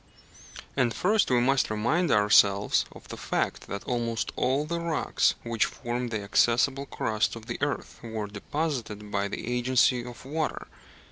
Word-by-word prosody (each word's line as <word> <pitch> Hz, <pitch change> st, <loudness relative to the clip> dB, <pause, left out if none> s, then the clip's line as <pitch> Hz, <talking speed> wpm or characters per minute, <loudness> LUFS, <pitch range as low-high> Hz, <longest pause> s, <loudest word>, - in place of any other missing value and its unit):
And 120 Hz, -5 st, +1 dB
first 210 Hz, -, +2 dB
we 125 Hz, -2 st, +4 dB
must 135 Hz, +2 st, +2 dB
remind 120 Hz, +12 st, +1 dB
ourselves 105 Hz, -1 st, +4 dB
of -, -, -14 dB
the -, -, -7 dB
fact -, -, -2 dB
that 100 Hz, 0 st, -5 dB
almost 115 Hz, -2 st, -2 dB
all 135 Hz, +4 st, +1 dB
the 170 Hz, +2 st, -2 dB
rocks 170 Hz, -2 st, +1 dB
which 115 Hz, -2 st, +1 dB
form 120 Hz, +1 st, -4 dB
the 110 Hz, -3 st, -3 dB
accessible 120 Hz, +7 st, +2 dB
crust 110 Hz, -2 st, -1 dB
of 115 Hz, -1 st, -10 dB
the -, -, -5 dB
earth 145 Hz, -2 st, -3 dB
were 110 Hz, -2 st, -4 dB
deposited 105 Hz, -1 st, -4 dB
by 100 Hz, 0 st, 0 dB
the -, -, -5 dB
agency 125 Hz, +1 st, +2 dB
of 120 Hz, +1 st, -10 dB
water. 155 Hz, +3 st, -2 dB
120 Hz, 155 wpm, -27 LUFS, 110-140 Hz, -, we